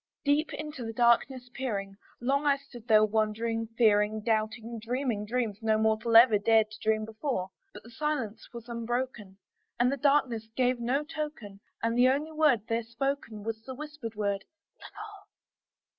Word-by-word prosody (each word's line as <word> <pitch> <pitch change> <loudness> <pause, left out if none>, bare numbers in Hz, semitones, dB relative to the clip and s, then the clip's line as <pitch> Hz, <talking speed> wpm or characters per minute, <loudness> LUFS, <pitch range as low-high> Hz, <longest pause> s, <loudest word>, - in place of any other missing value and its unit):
Deep 290 +2 +2
into 300 -6 -6
that 225 - -6
darkness 245 +1 +2
peering, 200 -7 -3 0.2
long 275 +4 +1
I 285 -1 +3
stood 260 -4 -14
there 215 -1 +6
wondering, 225 +1 -1
fearing, 215 -1 +3
Doubting, 225 +1 -1
dreaming 235 -2 -2
dreams 225 -3 -2
no 220 -1 +2
mortal 220 +1 +1
ever 230 -2 +8
dared 220 0 +3
to 210 - -11
dream 215 0 +1
before; 220 -4 -3 0.2
But - - -12
the 230 - -14
silence 260 -5 -3
was 235 -1 -9
unbroken, 235 -4 -4 0.4
and 245 +1 +3
the 280 - -3
stillness 265 -6 +2
gave 250 -1 +2
no 255 +5 0
token, 295 -10 -6 0.2
And 230 0 +1
the 250 +1 +5
only 290 +4 0
word 305 -7 +3
there 230 0 0
spoken 230 -2 -3
was 220 0 -4
the 260 +3 -8
whispered 295 -6 -7
word, 200 -1 -1 0.4
"Lenore?" 415 -1 -11
235 Hz, 160 wpm, -29 LUFS, 220-270 Hz, 0.4 s, ever